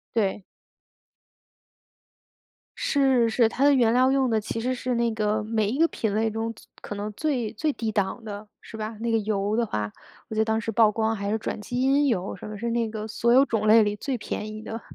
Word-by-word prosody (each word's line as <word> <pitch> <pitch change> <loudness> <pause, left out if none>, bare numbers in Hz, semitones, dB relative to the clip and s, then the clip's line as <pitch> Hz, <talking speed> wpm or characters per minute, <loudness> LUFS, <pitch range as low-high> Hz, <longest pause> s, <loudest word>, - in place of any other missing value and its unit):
对。 205 -3 0 2.4
是， 265 -5 +3
是， 225 0 +3
它 260 +4 -1
的 285 0 +6
原 235 -3 +4
料 255 +2 +4
用 265 -3 +2
的 220 - +2
其 220 +2 -4
实 255 +2 -1
是 250 0 -2
那 235 -1 +1
个 215 0 0
每 215 -1 0
一 245 - -1
个 330 - +5
品 220 -9 -2
类 220 +1 +1
中 225 +1 -3
最 - - -17 0.2
可 205 - -6
能 205 +1 -4
最 255 -5 -1
最 305 -2 0
低 225 -4 -3
档 205 +2 -1
的， 210 0 -7
是 225 - -11
吧。 220 0 -5
那 230 0 -1
个 225 - +3
油 210 0 -1
的 235 -1 +1
话， 105 - -3 0.4
我 220 - -6
记 - - -3
得 220 - +4
当 220 0 0
时 225 - -3
曝 225 0 +5
光 220 +1 0
还 200 0 -4
是 215 - +1
转 215 - -4
基 245 +4 -3
因 280 +2 +3
油 195 -6 -1
什 - - -9
么， 210 - -6
是 235 +3 -3
那 230 -1 0
个 215 -1 -5
所 235 +3 +1
有 265 +2 +7
种 220 -4 -1
类 220 +1 +7
里 205 0 0
最 260 +4 -3
便 210 -1 -5
宜 215 - -8
的。 225 +1 -6
225 Hz, 250 characters per minute, -25 LUFS, 210-240 Hz, 2.4 s, 有